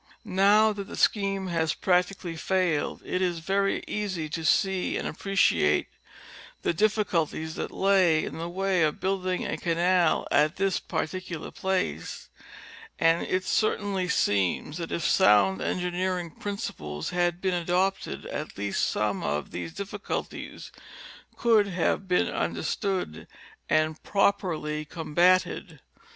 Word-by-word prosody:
Now 210 +2 +4
that 200 -1 -6
the - - -8
scheme 195 -2 +1
has 165 -2 0
practicall}^ 180 -2 0
failed 180 -5 0
it 185 - -1
is 175 -2 0
very 195 +4 0
easy 185 -7 -3
to 165 +2 -4
see 190 +3 +2
and - - -3
appreciate 195 0 +2 0.7
the - - +1
difficulties 165 -5 0
that - - -4
lay 185 -5 +3
in - - -6
the 170 +1 -4
way 190 0 0
of 155 -1 +1
building 185 -1 -1
a - - -2
canal 175 0 +2
at 150 +4 +3
this 195 -1 0
particular 170 0 -4
place; 180 - -3 0.7
and 165 +1 +2
it 185 0 0
certainly 200 -3 0
seems 100 - +1
that 170 -2 -5
if 170 - -2
sound 100 - +4
engineering 180 -1 -1
principles 140 - -5
had 175 -1 0
been 185 0 0
adopted 180 +3 -1
at - - -6
least 100 0 -1
some - - 0
of 75 0 -2
these 90 - -5
difficulties 200 +3 -6 0.7
could 220 -4 +4
have 185 +1 0
been 180 -1 +2
understood 185 - -2 0.4
and 155 0 +1
properly 160 -6 0
com 155 0 -8
batted. 185 +3 +2
180 Hz, 130 wpm, -27 LUFS, 160-195 Hz, 0.7 s, Now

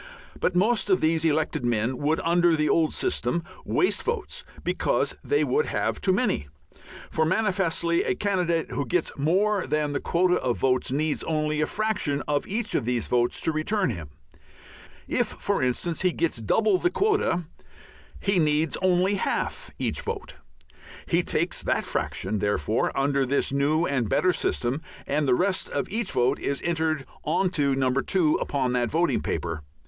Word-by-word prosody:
But 185 - 0
most 215 +4 +2
of 190 -1 +4
these 160 0 +1
elected 155 -4 +1
men 120 +1 0
would 150 +2 +1
under 175 0 +3
the 150 -1 +1
old 160 -2 +2
system 175 - -1 0.2
waste 370 - +1
votes 465 -3 -4 0.2
because - - 0
they 435 - +2
would 455 +2 +1
have - - -1
too 190 - +2
many; 195 - 0 0.6
for 160 - +1
manifestly 175 -2 +1
a - - 0
candidate 180 -5 0
who 140 - -2
gets 180 -2 0
more 190 +7 +1
than 150 -1 0
the 145 - -1
quota 180 +1 +2
of 125 -2 -1
votes 130 -1 +1
needs 150 +2 0
only 155 -1 0
a 155 - +1
fraction 205 -10 -1
of 145 -1 0
each 225 +4 -2
of - - +1
these 120 0 -1
votes 120 -1 +1
to 160 - +1
return 155 - 0
him. 85 -8 -7 1.0
If, - - +1
for - - -1
instance, 130 +7 0
he 185 -1 +3
gets 165 -5 -1
double 190 - +2
the - - +2
quota 410 - +1 0.8
he 195 -2 +1
needs 155 0 +1
only 185 +1 +3
half - - -2
each - - -1
vote. - - -5 0.7
He - - +2
takes - - -1
that - - 0
fraction, 110 - -2
therefore, 105 +2 0
under 140 0 +2
this 135 +1 0
new 150 +4 +2
and 130 -8 -1
better 185 0 +3
system, 130 0 -1 0.2
and 145 +1 0
the 125 - +4
rest 185 +5 0
of - - -2
each 225 -1 -1
vote 125 +3 +2
is 140 - -2
entered 160 -4 0 0.2
on 175 +4 +1
to 140 -6 +1
No. 130 -1 +1
2 155 +4 +2
upon 130 -3 -1
that 120 -2 +1
voting 170 +6 +1
paper. 85 0 -3
160 Hz, 170 wpm, -25 LUFS, 135-185 Hz, 1.0 s, of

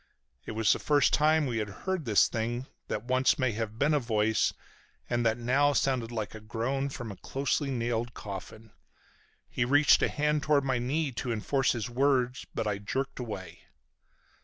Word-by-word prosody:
It - - -4
was 110 -1 +3
the - - -4
first 145 -2 +3
time 155 +1 +4
we 120 -4 -1
had 105 -1 -3 0.2
heard 190 -5 -1
this 105 -4 +4
thing 120 +3 -3 0.2
that 105 - -3
once 130 +2 +2
may 130 -3 +1
have 110 0 -4
been 145 +5 +2
a 150 - +3
voice 110 -3 +1 0.6
and 120 0 0
that 115 0 +2
now 135 +5 +2
sounded 130 -4 0
like 110 -3 -4
a 110 - -8
groan 120 +6 -2
from 120 -5 -6
a - - -8
closely 140 +1 -1
nailed 120 -2 -2
coffin. 105 +2 -8 0.8
He 125 - -1
reached 145 +4 +5
a - - +2
hand 150 0 0
toward 150 -2 +2
my 130 -2 0
knee 140 +4 -1
to 120 0 -4
enforce 130 +5 +1
his 115 -2 -3
words, 125 0 +1
but - - -1
I 105 -2 -1
jerked 130 +7 -3
away. 95 -8 -7
120 Hz, 185 wpm, -29 LUFS, 110-140 Hz, 0.8 s, reached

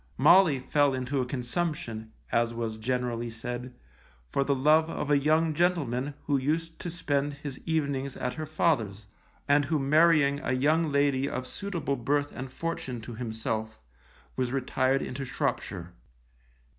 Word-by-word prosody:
Molly 155 +2 +6
fell 140 +1 +2
into 130 +1 -1
a 125 - -2
consumption, 125 -4 -3 0.2
as 115 0 +1
was 115 -2 -3
generally 120 0 -1
said, 120 +2 -5 0.6
for 140 - +2
the 140 0 +1
love 155 +4 +4
of 150 - -3
a 145 - +6
young 155 +2 +2
gentleman 145 -6 0
who 145 -1 +2
used 165 +4 -2
to 175 - -4
spend 145 -4 -1
his 145 -2 -7
evenings 140 -4 -1
at 125 - -2
her 155 -1 -5
father's, 115 - 0 0.4
and 145 0 +4
who 155 +2 +1
marrying 150 0 +4
a 130 - -1
young 155 +4 +2
lady 140 -1 +2
of 130 0 -4
suitable 170 -2 -3
birth 145 +4 0
and 130 0 -7
fortune 130 -5 -4
to 120 +2 -8
himself, 110 -1 -4 0.6
was 125 -2 -1
retired 130 0 +1
into 135 +2 -4
Shropshire. 85 -8 -3
140 Hz, 150 wpm, -28 LUFS, 125-150 Hz, 0.6 s, Molly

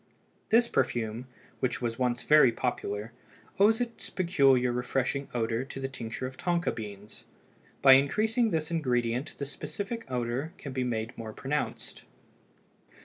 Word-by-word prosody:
This 235 +2 +5
perfume, 115 - -1 0.3
which 130 - -1
was 115 -1 -3
once 125 -1 0
very 150 -5 +6
popular, 115 -2 -3 0.5
owes 220 +3 +5
its 240 -1 -4
peculiar 135 -9 +3
refreshing 130 +3 -1
odor 115 0 -1
to 135 - -8
the 135 - -2
tincture 125 -2 -6
of 130 0 -7
tonka 175 -1 0
beans; 105 -2 -9 0.6
by 135 - +10
increasing 220 - +3
this 160 -3 -1
ingredient 125 -4 -1
the 140 - -3
specific 205 - -6
odor 125 +5 -2
can 140 - -7
be 130 -1 -1
made 115 -1 -2
more 110 -1 -7
pronounced. 145 +6 -3
130 Hz, 140 wpm, -29 LUFS, 120-155 Hz, 0.6 s, by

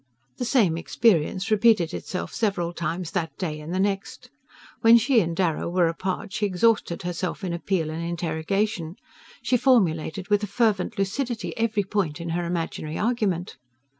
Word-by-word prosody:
The 245 - -2
same 215 -10 +3
experience 185 +1 +1
repeated 215 -6 +4
itself 180 - -5
several 175 -6 -1
times 170 +1 -3
that 160 -6 -3
day 155 -5 -3
and 150 +2 -7
the 185 - -1
next. 195 0 -2 0.5
When 230 0 +8
she 240 +1 +3
and 170 -4 -1
Darrow 170 -3 0
were 175 0 +3
apart 185 +4 -3
she 210 -1 0
exhausted 195 -1 +1
herself 180 +2 -3
in 180 -2 -2
appeal 170 -2 -1
and 165 +1 -4
interrogation, 170 +2 -2 0.5
she 250 - +2
formulated 190 - +2
with 205 0 +3
a 210 - -2
fervent 215 0 0
lucidity 230 +5 -2
every 225 -2 0
point 190 -6 -1
in 170 0 -5
her 175 +1 -1
imaginary 165 -2 -3
argument. 210 -6 -1
185 Hz, 160 wpm, -25 LUFS, 170-215 Hz, 0.5 s, When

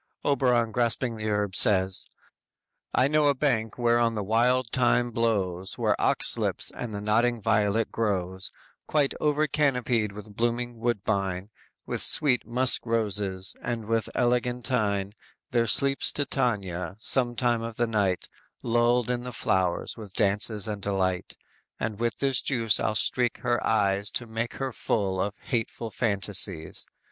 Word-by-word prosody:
Oberon 125 -5 +2
grasping 120 0 0
the 110 0 -3
herb 105 -2 -1
says: 95 -3 +2 0.9
_"I 130 - +4
know 150 0 +3
a 140 - +3
bank 120 -6 0
whereon 120 -1 +2
the 105 - -2
wild 120 +3 +1
thyme 120 -1 +2
blows 95 -6 -1
Where - - +1
ox - - +1
lips - - 0
and 120 - -6
the 105 - -4
nodding 115 +3 +1
violet 110 0 +1
grows; 95 -4 -2 0.4
Quite 145 -3 +1
over 150 0 +2
canopied 125 -7 0
with 105 0 -11
blooming 120 +1 -2
woodbine, 100 -4 -2 0.3
With - - -3
sweet 130 -5 +3
musk 125 +2 +2
roses, 100 -5 0
and 120 -2 -4
with 115 0 -1
eglantine; 120 -5 0 0.4
There 115 -1 +2
sleeps 135 +6 +3
Titania, 95 - -1
sometime 120 0 +2
of 115 0 -5
the 120 - +1
night 100 -5 0 0.4
Lulled 120 0 +2
in 120 -1 -2
these 125 -1 -7
flowers 90 -2 -1
with 105 -3 -10
dances 105 0 +3
and 105 -2 -4
delight, 95 -2 -1 0.4
And 110 -2 -3
with 115 0 -1
this 135 -2 +3
juice 115 -5 +1
I'll 110 - -1
streak 120 +2 +2
her 120 -2 0
eyes 100 -2 +1
To 120 - -2
make 115 +1 -4
her 135 -1 -3
full 95 -5 -1
of 100 +1 -2
hateful 115 -1 -3
fantasies. 100 -6 -1
115 Hz, 145 wpm, -26 LUFS, 100-120 Hz, 0.9 s, I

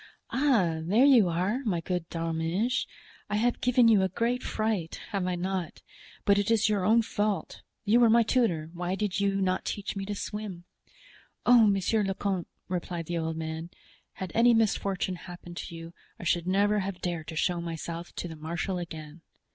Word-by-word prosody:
"Ah, 220 - +2
there 205 +11 +4
you 240 -10 +6
are, 185 +8 0
my 195 -8 0
good 175 0 -3
D'Arminges; 165 +8 -1 0.4
I 205 - -1
have 235 +3 +1
given 250 -1 +4
you 215 -4 +6
a 190 - +1
great 235 +6 0
fright, 215 -7 -2
have 195 -3 -1
I 180 - 0
not? 180 -1 -3 0.4
but 200 0 +5
it 205 - 0
is 225 -1 +3
your 205 -3 +1
own 225 +4 +4
fault. 205 -2 -2 0.2
You 220 +3 +5
were 235 -2 +6
my 230 +1 +6
tutor, 180 -10 +1
why 180 +1 -2
did 205 0 -1
you 200 0 +1
not 185 -1 0
teach 205 0 -4
me 195 - -3
to 205 - -3
swim?" 205 -4 -5 0.8
"Oh, 240 -3 +7
monsieur 200 +2 +2
le 195 -1 -1
comte," 190 -4 -2 0.2
replied 175 -2 -3
the 170 +1 -2
old 160 0 -2
man, 160 +1 -4 0.4
"had 190 -3 -6
any 235 +1 +5
misfortune 195 -4 0
happened 175 0 -10
to 170 - -6
you, 165 +1 -9 0.3
I - - -8
should 175 0 +1
never 205 +3 +3
have 190 -1 -4
dared 170 -3 -3
to 160 - -6
show 175 +2 0
myself 170 0 -5
to - - -4
the 165 - -8
marshal 170 +4 -3
again." 160 -2 -8
190 Hz, 185 wpm, -28 LUFS, 170-215 Hz, 0.8 s, Oh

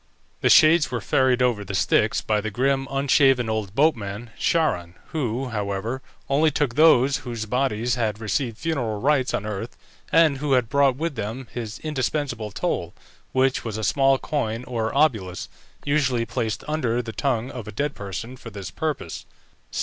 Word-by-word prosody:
The - - +2
shades 155 0 +6
were 125 -2 -2
ferried 130 +4 +2
over 120 -5 +1
the 100 - -5
Styx - - +2
by 105 -1 0
the 110 - -3
grim, 135 +5 0
unshaven 135 -2 +3
old 105 -2 -3
boatman 115 -6 0
Charon, 90 - 0
who, 130 -3 -2
however, 105 +3 -3 0.3
only 145 +4 +3
took 145 -4 0
those 140 -3 +5
whose 115 -3 -5
bodies 125 0 0
had 110 -4 -1
received 115 +1 -2
funereal 120 -10 -2
rites 135 0 +2
on 105 - -2
earth, 105 +2 -5 0.3
and 160 -4 +4
who 145 -1 0
had 125 -3 +2
brought 140 -2 +3
with 165 +4 -2
them 115 +2 -5
his 115 -3 -5
indispensable 135 -6 -2
toll, - - -3 0.4
which 130 0 +1
was 110 -2 -4
a 110 - -4
small 135 +3 +3
coin 125 -6 -2
or 115 -3 -2
obolus, 110 - +1 0.4
usually 135 -5 +1
placed 115 -3 -3
under 125 -6 0
the 115 -1 -7
tongue 125 -2 -1
of 120 -5 -7
a - - -6
dead 145 +5 -2
person 105 +5 -6
for 120 - -10
this 100 -3 -7
purpose. 150 - -4
125 Hz, 165 wpm, -24 LUFS, 110-140 Hz, 0.4 s, shades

